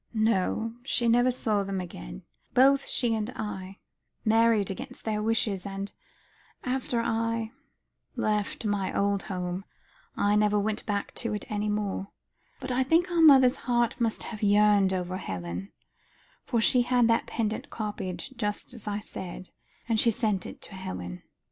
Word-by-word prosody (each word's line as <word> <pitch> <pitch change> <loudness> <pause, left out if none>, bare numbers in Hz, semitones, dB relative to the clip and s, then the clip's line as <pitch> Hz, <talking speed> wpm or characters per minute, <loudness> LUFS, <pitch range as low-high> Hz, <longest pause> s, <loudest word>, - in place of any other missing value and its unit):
"No, 220 +1 +1
she 245 -2 0
never 245 +2 +5
saw 220 -5 0
them 195 -1 -2
again. - - -8 0.3
Both 275 +2 +5
she 240 -3 +1
and 220 0 -1
I 195 -2 -5 0.5
married 225 -2 +4
against 190 - -7
their 215 -1 0
wishes, 215 -4 0
and 195 0 -5 0.7
after 250 -2 -1
I 230 0 -1 0.6
left 210 +1 -1
my 205 -2 -1
old 200 0 +1
home, 180 -1 -4 0.5
I 205 +1 +3
never 210 0 +3
went 210 +1 -2
back 205 -1 -2
to 230 -3 -1
it 210 - -5
any 210 0 -1
more. 205 -2 -2 0.5
But 260 -1 -4
I 250 +1 +2
think 330 +7 +3
our 340 -1 +3
mother's 270 -4 +7
heart 240 0 +1
must 225 -2 0
have 215 -3 -7
yearned 205 -1 +5
over 185 0 -2
Helen, 90 - -5 0.7
for 235 - +1
she 245 +2 +4
had 245 -1 +3
that 230 - +2
pendant 220 -2 -2
copied, 205 -5 -4
just 210 +1 -3
as 235 -3 -9
I 205 0 -2
said, 185 -2 -7 0.4
and 225 -2 +2
she 235 - +5
sent 210 -4 0
it - - -11
to - - -9
Helen. 90 - -6
210 Hz, 155 wpm, -28 LUFS, 195-230 Hz, 0.7 s, mother's